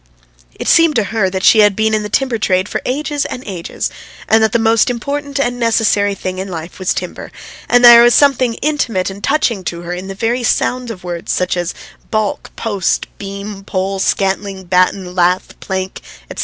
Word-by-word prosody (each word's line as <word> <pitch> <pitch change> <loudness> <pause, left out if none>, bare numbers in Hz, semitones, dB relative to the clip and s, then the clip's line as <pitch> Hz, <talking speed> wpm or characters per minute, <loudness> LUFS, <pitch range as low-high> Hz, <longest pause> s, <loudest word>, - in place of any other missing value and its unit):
It - - -6
seemed 330 -2 +5
to 225 - +2
her 205 -4 +1
that 190 0 -4
she 220 - +6
had 205 -2 +5
been 220 +1 +1
in 215 - +1
the 210 - -5
timber 250 0 0
trade 185 -2 +1
for - - -3
ages 290 +2 -1
and 250 - -6
ages, 180 -4 -4 0.4
and 220 0 +4
that 220 - +2
the - - +2
most 225 0 +3
important 280 +3 -3
and 245 -2 -1
necessary 215 -3 +2
thing 185 -1 -5
in 190 - -4
life 170 -1 -7
was 185 - -1
timber; - - -5 0.4
and 245 0 +5
there 235 0 +10
was 240 0 +5
something 260 -5 +3
intimate 235 -11 0
and 200 +1 -11
touching 240 -9 0
to 170 0 -4
her 175 0 -5
in 180 +2 -6
the 195 - -6
very 230 +5 -1
sound 245 +1 0
of 190 -5 -8
words 175 -1 -5
such 180 - 0
as 175 -1 -3 0.3
"baulk," 215 -2 -2
"post," 205 -5 -1
"beam," 200 0 -7
"pole," 195 0 -2
"scantling," 195 0 -1
"batten," 180 0 +1
"lath," 180 +1 +1
"plank," 190 0 -4 0.3
etc. - - -8
205 Hz, 195 wpm, -16 LUFS, 190-240 Hz, 0.4 s, there